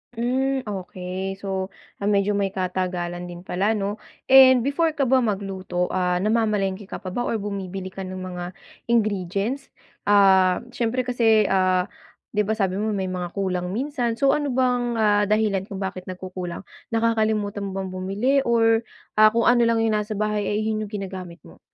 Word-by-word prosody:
Hmm, 260 +3 0
okey. 190 -2 -5
So, 190 -1 -3 0.3
ah, 200 - -2
medyo 200 0 +2
may 200 -1 +1
katagalan 180 -1 -2
din 175 0 -9
pala, 200 +5 0
'no, 205 +1 -3 0.3
and 260 -2 +8
before 310 +4 +1
ka 280 - +1
ba 260 +1 +4
magluto, 190 -5 -2
ah, 180 -1 +1
namamalengke 210 -3 0
ka - - -7
pa 185 - -5
ba 245 +5 -2
or - - 0
bumibili 195 -2 -5
ka 190 0 -6
ng 185 - -6
mga 180 -1 -5 0.4
ingredients? 215 +3 0 0.4
Ah, 190 -2 +5
siyempre 245 +2 -1
kasi, 230 -3 +3
ah, 185 0 +2 0.4
'di 210 - +1
ba, 220 - +1
sabi 195 -2 0
mo 215 -1 -1
may 190 -1 -2
mga 180 -1 -5
kulang 185 -2 -1
minsan, 250 -3 -1
so 275 +3 +3
ano 295 -1 0
bang, 250 -2 +1
ah, 210 -2 +3
dahilan 210 -2 +1
kung 195 - -7
bakit 185 -1 -5
nagkukulang? 185 -1 -6 0.2
Nakakalimutan 215 -3 0
mo 190 - -6
bang 190 -1 -3
bumili 200 +9 0
or, 225 -1 +3 0.3
ah, 215 - +9
kung 230 +1 +1
ano 240 -1 +4
lang 225 -1 +2
yung 225 - +2
nasa 210 0 -4
bahay 210 -1 -1
ay 210 +1 0
'yon 215 -1 -2
yung - - -16
ginagamit 190 -4 -7
mo? 80 - -16
205 Hz, 175 wpm, -23 LUFS, 185-230 Hz, 0.4 s, ah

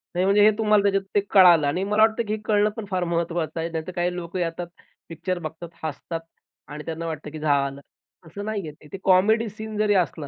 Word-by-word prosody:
नाही, 180 +1 +2
म्हणजे 200 +2 +4
हे 215 - +7
तुम्हाला 210 -2 +3
त्याच्यात 195 -1 +2
ते - - +6
कळालं 175 -6 +6
आणि 175 +7 0
मला 210 +2 +1
वाटतं 220 +1 +2
की 210 - -1
हे 215 - -3
कळणं 210 -1 +3
पण 225 - -5
फार 185 -1 0
महत्वाचं 170 -1 -2
आहे. 165 +1 -2
नाहीतर 165 +1 -4
काही 175 0 0
लोक 170 -1 -7
येतात, 175 0 -2 0.4
पिक्चर 175 +2 -3
बघतात, 160 +1 -7
हसतात 160 +2 -4 0.5
आणि 150 0 -8
त्यांना 165 0 -4
वाटतं 155 -2 -5
की 155 - -7
झालं. 140 -2 0 0.5
असं 200 +6 -8
नाही 215 -1 -2
आहे - - -6
ते. 150 - -15
ते - - -3
कॉमेडी 215 +5 +4
सीन 215 +1 -7
जरी 210 -1 +2
असला 165 -5 0
175 Hz, 220 wpm, -24 LUFS, 160-205 Hz, 0.5 s, हे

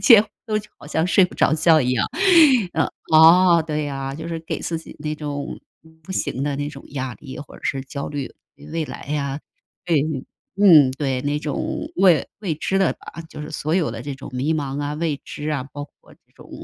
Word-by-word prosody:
几 230 -6 +9
乎 220 - -3 0.3
就 215 - -10
好 - - -13
像 160 +3 0
睡 185 0 +5
不 - - -5
着 - - +3
觉 160 0 +5
一 125 -1 0
样， 125 - +1 0.7
嗯。 - - +2 0.3
哦， 170 +2 +7
对 150 -1 -2
呀， 135 -1 -4
就 160 +2 -7
是 165 -1 -3
给 160 - -5
自 165 -1 -3
己 - - -12
那 155 0 -3
种 145 -2 -5 0.4
不 190 - -13
行 135 -7 -2
的 145 -1 -1
那 145 0 -3
种 140 - -11
压 130 -3 -4
力， 135 -2 -10
或 145 - -10
者 - - -15
是 135 - -1
焦 140 +1 -6
虑 145 -3 -5 0.4
未 165 -1 -1
来 - - -8
呀 140 -1 -2 0.5
对， 165 -4 +2 0.6
嗯， 160 -10 +7
对 135 -2 -2
那 145 +2 -1
种 150 -2 -3
未 180 -5 +4
未 185 -7 -2
知 195 +5 -1
的 190 -3 +2
啊 165 - -9
就 150 - -8
是 150 - -7
所 155 +1 -2
有 165 -9 +1
的 115 - -6
这 140 +2 -5
种 135 0 -10
迷 135 +5 0
茫 140 -1 -3
啊、 145 +1 -3
未 155 -2 -2
知 150 +1 -6
啊， 140 -4 -2
包 145 0 -5
括 - - -21
这 - - -38
种 - - -16
150 Hz, 230 characters per minute, -22 LUFS, 140-165 Hz, 0.7 s, 几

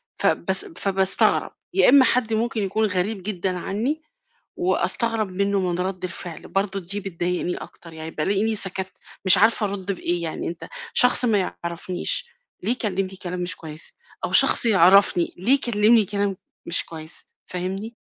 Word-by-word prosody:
فباس 410 - +1
فباستغرب، 195 - +2 0.2
يا 385 - +4
إمّا 265 0 +7
حد 235 -3 +1
ممكن 225 -1 -1
يكون 205 +3 0
غريب 185 +2 -2
جدًا 185 -2 -3
عنّي 235 - -3 0.6
وأستغرب 230 - 0
منّه 200 +1 0
من 180 -2 -2
رَد 185 0 -3
الفعل، 175 -2 -7
برضه 195 0 -2
دي 200 +4 -4
بتضايقني 180 -2 -3
أكتر، 170 -1 -12
يعني 160 0 -8
بالاقيني 200 +8 0
سكتّ، 190 -1 -1 0.3
مش 190 0 +8
عارفة 220 +1 +3
أرُد 200 -1 -4
بإيه 175 -1 -2
يعني. 160 - -4
أنت 170 +1 -7 0.3
شخص 250 0 +6
ما 220 -4 +2 0.2
يعرفنيش 175 - 0 0.4
ليه 210 - 0
يكلِّمني 195 -5 -2
كلام 180 0 -4
مش 175 +1 0
كويّس؟ 155 -1 -6 0.3
أو - - -5
شخص - - +6
يعرفني 190 -3 +4
ليه 215 +9 +2
يكلِّمني 230 -4 +3
كلام 200 -1 -2 0.3
مش 170 - +2
كويس، 160 0 -7 0.2
فاهمني؟ 190 +5 -5
195 Hz, 150 wpm, -22 LUFS, 180-220 Hz, 0.6 s, مش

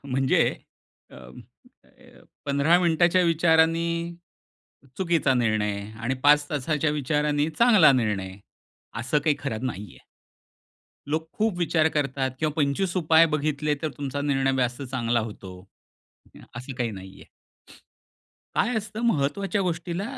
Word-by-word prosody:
म्हणजे 135 -1 +1 0.7
अं, 60 0 -13 0.4
अ, - - -21 0.2
15 140 +5 +3
मिनिटांच्या 175 +1 +3
विचारांनी 170 0 +2 0.9
चुकीचा 170 -7 +1
निर्णय 110 -4 0 0.2
आणि 130 +3 -1
5 145 0 +5
तासाच्या 150 +1 -1
विचारानी 150 +1 0
चांगला 215 - +6
निर्णय, 105 -6 -1 0.6
असं 130 +5 0
काही 150 -3 +2
खरं 130 -3 -3
नाहीये. 105 -5 -7 1.1
लोक 160 +2 -2
खूप 215 -4 0
विचार 160 -2 +2
करतात 135 -2 -1
किंवा 155 0 -1
25 160 +5 0
उपाय 165 -1 +5
बघितले, 150 0 -1
तर 155 - 0
तुमचा 140 0 -4
निर्णय 135 -2 0
जास्त 125 +1 -1
चांगला 120 -2 -1
होतो 95 -4 -8 0.8
अ, - - -13 0.2
असं 130 +3 -7
काही 120 -2 -1
नाहीये. 95 -1 -11 1.3
काय 245 - +1
असतं 215 +1 -5
महत्त्वाच्या 195 +3 0
गोष्टीला 175 +1 -3
145 Hz, 120 wpm, -25 LUFS, 130-165 Hz, 1.3 s, चांगला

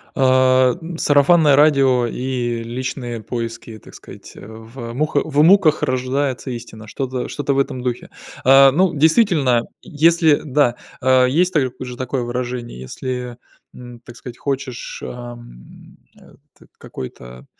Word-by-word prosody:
Э, 130 -1 +3 0.2
сарафанное 145 0 +4
радио 135 -4 +3
и 120 -1 -3
личные 120 0 -5
поиски, 115 0 -6
так - - -17
сказать. - - -13
В 115 +3 -10
муха 145 +3 0
в 150 -1 +1
муках 165 -2 +4
рождается 130 +1 -2
истина, 115 -2 -9
что-то 130 +2 -4
что-то 145 -1 -2
в - - -1
этом 135 -2 -1
духе. 125 -1 -4 0.3
Э, 135 +1 +7
ну, 175 +5 +1
действительно, 155 - +3 0.2
если 160 0 +2
Да. 140 -4 +1 0.2
А, 130 0 +4
есть 175 +8 +1
та 155 - +4 0.2
же 125 -1 -7
такое 130 0 -3
выражение, 120 - -5
если, 125 - -6 0.4
м, 120 -1 -12
так 120 0 -14
сказать, 125 -2 -10
хочешь, 135 -3 -5
ам, 120 - -11 0.2
а, - - -19 0.2
т - - -20
какой-то 65 0 -10
130 Hz, 135 wpm, -19 LUFS, 120-145 Hz, 0.4 s, Э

